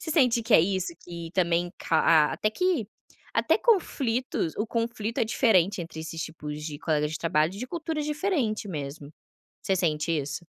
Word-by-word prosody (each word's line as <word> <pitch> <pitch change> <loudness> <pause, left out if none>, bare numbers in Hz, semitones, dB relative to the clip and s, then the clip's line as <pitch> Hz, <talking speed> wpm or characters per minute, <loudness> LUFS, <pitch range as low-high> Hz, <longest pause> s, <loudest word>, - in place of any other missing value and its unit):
Você 320 - -5
sente 250 -7 +3
que 225 0 +3
é - - +9
isso? 185 0 0
Que 170 -2 -7
também 175 -1 +1
ca 160 - +1
ah, 155 -2 +5
até 215 - 0
que 345 - 0 0.5
até - - +2
conflitos 260 - +1
o 210 - -1
conflito 230 -1 -2
é - - +3
diferente 200 -5 +3
entre 165 -1 -7
esses 160 0 -5
tipos 150 -2 -6
de 150 -2 -5
colegas 150 -2 0
de 155 - -4
trabalho 160 0 +1
e 200 - -9
de 250 - -4
culturas 320 0 -3
diferentes 300 - -1
mesmo. 145 -1 -6 0.5
Você 190 - +1
sente 155 -2 0
isso? 150 +2 -3
185 Hz, 180 wpm, -27 LUFS, 160-235 Hz, 0.5 s, é